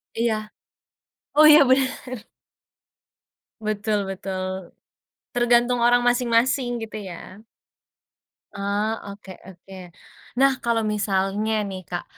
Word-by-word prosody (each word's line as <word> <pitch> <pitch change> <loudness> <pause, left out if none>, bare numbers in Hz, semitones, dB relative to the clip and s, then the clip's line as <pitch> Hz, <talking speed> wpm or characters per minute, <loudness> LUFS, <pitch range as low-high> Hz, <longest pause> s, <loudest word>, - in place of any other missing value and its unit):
Iya. 220 -2 -1 0.9
Oh, 305 - +7
iya, 305 0 +9
benar. 255 -3 -1 1.3
Betul 210 -1 -1
betul. 190 -1 -5 0.6
Tergantung 240 0 +2
orang 245 +1 +4
masing-masing, 245 0 +1
gitu, 220 -1 -6
ya. 185 +1 -10 1.2
Oh, 200 +2 -1 0.3
oke 200 -1 -13
oke. 190 +1 -14 0.7
Nah, 275 0 +6
kalau 235 -1 +1
misalnya, 210 0 -1 0.2
nih, 185 -1 -6
Kak. 175 - -4
215 Hz, 95 wpm, -23 LUFS, 195-240 Hz, 1.3 s, iya